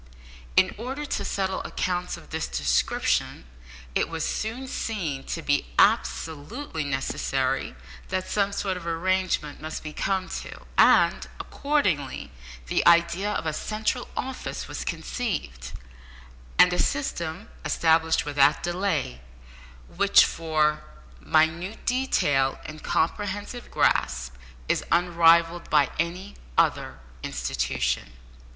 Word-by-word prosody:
In -, -, +5 dB
order 265 Hz, +5 st, -4 dB
to -, -, -2 dB
settle 190 Hz, -1 st, -1 dB
accounts 180 Hz, -1 st, -2 dB
of -, -, -15 dB
this -, -, -2 dB
description, 60 Hz, -1 st, 0 dB, 0.5 s
it -, -, +1 dB
was 165 Hz, -1 st, -2 dB
soon 235 Hz, +5 st, -3 dB
seen 170 Hz, -, -3 dB
to 165 Hz, -, -4 dB
be 145 Hz, -, +1 dB
absolutely 155 Hz, -, +1 dB
necessary 135 Hz, -, -1 dB, 0.3 s
that 185 Hz, 0 st, -2 dB
some 200 Hz, -1 st, +1 dB
sort 195 Hz, -2 st, -2 dB
of 170 Hz, -1 st, -8 dB
arrangement 170 Hz, -3 st, 0 dB
must 155 Hz, 0 st, -5 dB
be 155 Hz, -1 st, -6 dB
come 190 Hz, +1 st, -1 dB
to, -, -, -7 dB
and, -, -, +5 dB
accordingly, 180 Hz, -, -1 dB, 0.3 s
the -, -, +1 dB
idea 170 Hz, +4 st, +4 dB
of -, -, -2 dB
a 155 Hz, -, -1 dB
central 215 Hz, +8 st, -2 dB
office 265 Hz, 0 st, -4 dB
was -, -, -5 dB
conceived, 145 Hz, -, -4 dB, 0.9 s
and 180 Hz, 0 st, +7 dB
a 180 Hz, -, -1 dB
system 160 Hz, +6 st, -2 dB
established 160 Hz, -1 st, +2 dB
without 145 Hz, 0 st, +3 dB
delay, 175 Hz, -, -1 dB, 0.7 s
which, -, -, +5 dB
for 155 Hz, -2 st, 0 dB, 0.4 s
minute 160 Hz, -, +1 dB
detail 145 Hz, -, +1 dB
and 155 Hz, 0 st, -8 dB
comprehensive 205 Hz, +7 st, -2 dB
grasp, 60 Hz, 0 st, +1 dB, 0.3 s
is -, -, +1 dB
unrivalled 170 Hz, 0 st, +4 dB
by 145 Hz, -3 st, +4 dB
any 180 Hz, +4 st, -2 dB, 0.2 s
other -, -, +1 dB, 0.2 s
institution. 65 Hz, -1 st, -2 dB
165 Hz, 115 wpm, -26 LUFS, 145-195 Hz, 0.9 s, and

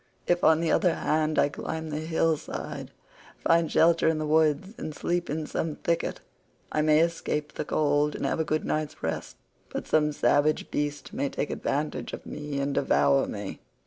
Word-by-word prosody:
If, 175 Hz, 0 st, +1 dB
on 160 Hz, 0 st, +5 dB
the 165 Hz, -, +1 dB
other 175 Hz, -3 st, +3 dB
hand, 155 Hz, 0 st, 0 dB
I -, -, +5 dB
climb 160 Hz, +2 st, -5 dB
the 150 Hz, -, -2 dB
hill 160 Hz, 0 st, +1 dB
side, -, -, -6 dB, 0.5 s
find 165 Hz, -1 st, +2 dB
shelter 165 Hz, 0 st, +4 dB
in 160 Hz, -1 st, +3 dB
the 155 Hz, -, -2 dB
woods, 155 Hz, +5 st, +2 dB
and 155 Hz, -, -5 dB
sleep 175 Hz, +3 st, -1 dB
in 155 Hz, +1 st, -2 dB
some 155 Hz, 0 st, -2 dB
thicket, 170 Hz, 0 st, -1 dB, 0.5 s
I 155 Hz, -, +1 dB
may 155 Hz, 0 st, +5 dB
escape 155 Hz, -3 st, -1 dB
the -, -, -4 dB
cold 150 Hz, 0 st, +1 dB
and -, -, -3 dB
have -, -, 0 dB
a -, -, +3 dB
good 155 Hz, 0 st, -1 dB
night's 155 Hz, 0 st, -2 dB
rest, 80 Hz, -, -3 dB, 0.3 s
but -, -, -4 dB
some 150 Hz, -1 st, +2 dB
savage 145 Hz, +1 st, +2 dB
beast 145 Hz, 0 st, -3 dB
may 140 Hz, -, -1 dB
take 145 Hz, -, -3 dB
advantage 150 Hz, +2 st, -2 dB
of -, -, -7 dB
me 150 Hz, -1 st, -5 dB
and 140 Hz, 0 st, -1 dB
devour 70 Hz, -, +3 dB
me." -, -, -6 dB
155 Hz, 185 wpm, -27 LUFS, 150-160 Hz, 0.5 s, on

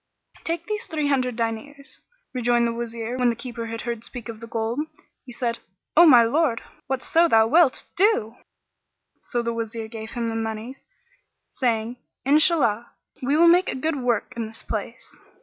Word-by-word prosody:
"Take 335 Hz, 0 st, -2 dB
these 425 Hz, +1 st, -3 dB
three 305 Hz, -3 st, -1 dB
hundred 255 Hz, -3 st, +1 dB
diners," 260 Hz, +5 st, -5 dB, 0.3 s
rejoined 240 Hz, -1 st, +2 dB
the 235 Hz, -, 0 dB
Wazir 235 Hz, +1 st, -4 dB
When 250 Hz, -1 st, +3 dB
the 235 Hz, -, 0 dB
Keeper 235 Hz, -1 st, -6 dB
heard 230 Hz, 0 st, -4 dB
speak 240 Hz, -1 st, -7 dB
of 225 Hz, -1 st, -7 dB
the 230 Hz, -, -9 dB
gold, 225 Hz, +3 st, -2 dB, 0.5 s
he -, -, -8 dB
said, 235 Hz, -1 st, -2 dB, 0.4 s
"O 340 Hz, +2 st, +8 dB
my 245 Hz, -6 st, +8 dB
lord, 245 Hz, 0 st, +1 dB, 0.2 s
whatso 320 Hz, +6 st, +2 dB
thou 225 Hz, -6 st, +5 dB
wilt, 305 Hz, +2 st, +3 dB
do!" 355 Hz, -, +2 dB, 0.9 s
So 240 Hz, -1 st, -2 dB
the 235 Hz, 0 st, -1 dB
Wazir 225 Hz, -1 st, -4 dB
gave 220 Hz, -1 st, -8 dB
him 235 Hz, -2 st, -2 dB
the 225 Hz, -, -3 dB
monies, 225 Hz, +3 st, -5 dB, 0.7 s
saying, 235 Hz, -2 st, -1 dB, 0.3 s
"Inshallah, 275 Hz, -6 st, +3 dB, 0.3 s
we 275 Hz, +4 st, +1 dB
will 340 Hz, +1 st, +6 dB
make 355 Hz, +2 st, +5 dB
a -, -, -2 dB
good 305 Hz, +3 st, -1 dB
work 245 Hz, -4 st, -1 dB
in 230 Hz, -1 st, -3 dB
this 225 Hz, +1 st, -7 dB
place!" -, -, -6 dB
240 Hz, 165 wpm, -24 LUFS, 230-280 Hz, 0.9 s, O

